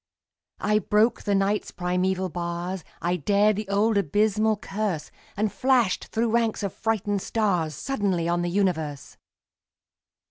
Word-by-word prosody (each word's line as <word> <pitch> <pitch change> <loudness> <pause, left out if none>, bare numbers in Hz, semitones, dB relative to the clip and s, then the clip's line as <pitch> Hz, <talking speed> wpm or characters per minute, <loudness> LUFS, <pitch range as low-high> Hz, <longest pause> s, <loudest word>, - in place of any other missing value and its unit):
I 210 0 +2
broke 215 +3 +2
the 205 -2 0
Night's 195 +2 +1
primeval 180 +1 -1
bars, 175 +1 -4 0.2
I 175 +1 +1
dared 205 +6 +3
the 210 0 -4
old 205 +1 +3
abysmal 210 +4 +2
curse, 200 -5 -3 0.3
And 210 0 0
flashed 250 -7 +2
through 225 0 -1
ranks 230 -2 +1
of 200 - -2
frightened 205 -3 -1
stars 180 -10 0
Suddenly 195 - -1
on 175 0 +1
the 175 - -1
universe! 160 -7 -1
200 Hz, 135 wpm, -25 LUFS, 180-215 Hz, 0.3 s, dared